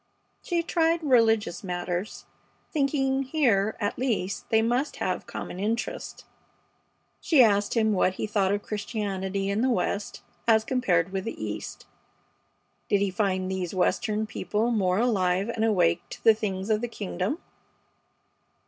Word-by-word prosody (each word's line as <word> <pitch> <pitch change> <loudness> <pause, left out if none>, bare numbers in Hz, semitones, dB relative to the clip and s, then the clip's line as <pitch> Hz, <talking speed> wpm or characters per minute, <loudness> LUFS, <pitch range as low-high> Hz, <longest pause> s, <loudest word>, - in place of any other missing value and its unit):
She 340 -2 -1
tried 330 0 +1
religious 225 - +3
matters, 180 +1 -4 0.5
thinking 275 -2 +1
that 270 - -5
here 225 -9 +2
at 205 -2 -2
least 205 -6 -2
they 220 0 +3
must 245 +5 0
have - - -3
common 180 - -6
interests. 225 +4 -3 0.9
She 290 -6 +5
asked 205 -1 +2
him 220 -2 +3
what 185 -1 +2
he - - -2
thought 205 -2 +1
of 205 0 -1
Christianity 200 -2 -3
in 205 +2 0
the 260 - +2
West 210 -4 -2 0.2
as 220 -1 +5
compared 195 -9 +1
with 190 -1 -3
the 230 - -5
East. 105 -1 -6 1.0
Did 205 - +3
he 200 -1 0
find 185 -1 0
these 190 -1 -3
Western 215 +3 +1
people 215 +2 -1
more 190 -5 +1
alive 200 -4 +1
and 230 -2 -1
awake 175 -6 +3
to - - -10
the 225 - +7
things 200 -1 -3
of 215 0 +2
the 240 - -1
Kingdom? 205 - -3
210 Hz, 150 wpm, -26 LUFS, 190-235 Hz, 1.0 s, the